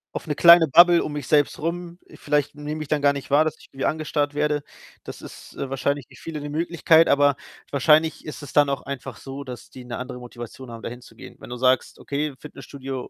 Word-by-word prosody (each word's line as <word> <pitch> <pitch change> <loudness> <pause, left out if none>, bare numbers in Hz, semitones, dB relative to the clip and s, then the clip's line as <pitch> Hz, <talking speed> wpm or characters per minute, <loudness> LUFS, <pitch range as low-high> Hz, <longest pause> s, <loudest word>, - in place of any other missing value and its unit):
„auf - - -5
'ne 150 - -2
kleine 170 -1 +8
Bubble 175 +3 +6
um 150 - -5
mich 145 -4 -5
selbst 145 -2 +2
rum.“ 170 +2 -4 0.2
Vielleicht 145 0 -1
nehme 150 +1 -5
ich 150 - -6
dann 150 -1 0
gar 140 0 +4
nicht 140 0 -7
wahr, 145 +3 +5
dass 155 - -3
ich - - -17
irgendwie 135 - -4
angestarrt 150 -2 -1
werde. 150 0 0 0.4
Das - - -9
ist, - - -12
äh, 135 - -5
wahrscheinlich 140 0 -2
für - - -18
viele 155 -3 -7
'ne 145 - -6
Möglichkeit, 165 +1 +3
aber 145 -1 +4 0.4
wahrscheinlich 155 +3 +3
ist 150 0 -8
es 140 - -10
dann 145 -1 +4
auch 135 -2 -2
einfach 140 -2 -7
so, 135 +1 -8
dass 125 -2 -9
die 130 - -11
'ne 120 - -6
andere 125 0 -7
Motivation 120 +1 -10
haben, 115 -1 -9
da - - -4
hinzugehen. 120 -2 -12
Wenn - - -12
du 125 - -6
sagst: 130 0 +1
„Okay, 145 0 -3
Fitnessstudio 135 -3 -8
145 Hz, 225 wpm, -23 LUFS, 135-155 Hz, 0.4 s, kleine